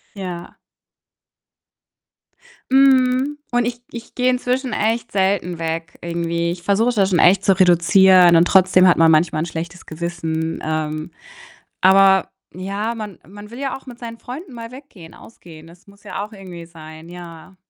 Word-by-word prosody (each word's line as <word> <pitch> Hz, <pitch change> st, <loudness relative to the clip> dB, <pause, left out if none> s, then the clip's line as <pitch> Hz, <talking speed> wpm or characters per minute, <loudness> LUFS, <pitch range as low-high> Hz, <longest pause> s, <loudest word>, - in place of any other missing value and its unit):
Ja. 180 Hz, -3 st, -8 dB, 2.2 s
Mhm, 265 Hz, +1 st, +3 dB
und 245 Hz, 0 st, +1 dB
ich 240 Hz, 0 st, -5 dB
ich 235 Hz, -1 st, -10 dB
gehe 250 Hz, 0 st, +1 dB
inzwischen 250 Hz, 0 st, -2 dB
echt 230 Hz, +2 st, -1 dB
selten 190 Hz, -3 st, -1 dB
weg 165 Hz, +1 st, -5 dB
irgendwie. 170 Hz, 0 st, -2 dB
Ich 175 Hz, 0 st, -9 dB
versuche 220 Hz, +6 st, +1 dB
das 195 Hz, -3 st, +2 dB
schon 180 Hz, -, +1 dB
echt 190 Hz, +3 st, +4 dB
zu 195 Hz, -1 st, +2 dB
reduzieren, 180 Hz, 0 st, +5 dB
und 165 Hz, -, +5 dB
trotzdem 185 Hz, -1 st, +4 dB
hat 180 Hz, -, +5 dB
man 165 Hz, 0 st, +4 dB
manchmal 155 Hz, 0 st, +2 dB
'n -, -, -3 dB
schlechtes 170 Hz, +1 st, -7 dB
Gewissen. 165 Hz, -1 st, -4 dB
Ähm, 155 Hz, 0 st, -3 dB, 0.7 s
aber 190 Hz, 0 st, +4 dB, 0.2 s
ja, 200 Hz, +5 st, -4 dB
man 215 Hz, -5 st, -8 dB
man 205 Hz, +3 st, -12 dB
will 235 Hz, -, -11 dB
ja 275 Hz, -2 st, -3 dB
auch 265 Hz, -, -14 dB
mit 245 Hz, -2 st, -10 dB
seinen 230 Hz, -1 st, -9 dB
Freunden 275 Hz, +4 st, -9 dB
mal 230 Hz, 0 st, -9 dB
weggehen, 250 Hz, -, -14 dB
ausgehen. 165 Hz, -7 st, -15 dB
Das 170 Hz, +3 st, -19 dB
muss 200 Hz, 0 st, -20 dB
ja 200 Hz, -, -5 dB
auch 210 Hz, -, -10 dB
irgendwie 185 Hz, -5 st, -11 dB
sein, 160 Hz, 0 st, -13 dB
ja. 175 Hz, +1 st, -12 dB
185 Hz, 160 wpm, -19 LUFS, 170-230 Hz, 2.2 s, reduzieren